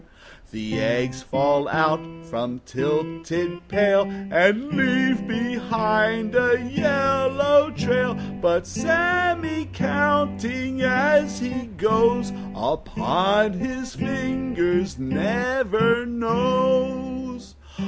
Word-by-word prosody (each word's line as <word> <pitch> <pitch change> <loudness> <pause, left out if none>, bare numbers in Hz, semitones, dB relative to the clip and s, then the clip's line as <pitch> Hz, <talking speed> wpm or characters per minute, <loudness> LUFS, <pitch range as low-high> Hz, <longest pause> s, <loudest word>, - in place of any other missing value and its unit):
The 110 0 -5
eggs 125 +2 -1
fall 140 +2 +1
out 160 +2 -1
from 125 -4 -5
tilted 165 +5 -3
pail 200 0 +3
And 195 - +1
leave 260 -4 +1
behind 225 -1 0
a 245 -1 +3
yellow 280 +2 +2
trail; 250 -4 0 0.3
But 175 0 +2
Sammy, 335 +3 0
counting, 100 - 0
as 270 +4 +3
he 250 0 -5
goes, 225 0 +2 0.2
Upon 200 +6 0
his 255 +5 -5
fingers, 255 -9 -2
never 230 - 0
knows. 255 +1 -1
230 Hz, 80 wpm, -22 LUFS, 175-255 Hz, 0.3 s, pail